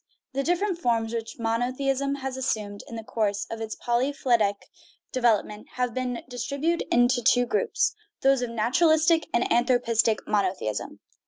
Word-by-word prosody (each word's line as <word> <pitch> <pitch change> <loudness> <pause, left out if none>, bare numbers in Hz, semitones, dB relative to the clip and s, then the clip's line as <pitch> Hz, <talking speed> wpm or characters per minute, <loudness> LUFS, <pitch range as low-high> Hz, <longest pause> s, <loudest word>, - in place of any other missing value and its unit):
The 275 - 0
different 355 +4 0
forms 230 -6 0
which 230 -1 -4
monotheism 255 +4 0
has 265 -1 -5
assumed 210 -6 -3
in 230 - -8
the 225 - -6
course 205 -2 -1
of 225 0 -5
its 220 -1 -4
polyphyletic 240 -4 +1 0.6
development 215 -4 +1
may 250 - +3 0.3
be - - -6
distributed 280 +7 -2
in 245 0 +5
two 245 0 +3
groups 455 - 0 0.3
those 270 -1 +4
of 245 - -2
naturalistic 315 +8 +3
and 235 - +2
anthropistic 235 -2 +2
monotheism. 190 - -1
245 Hz, 140 wpm, -26 LUFS, 225-270 Hz, 0.6 s, in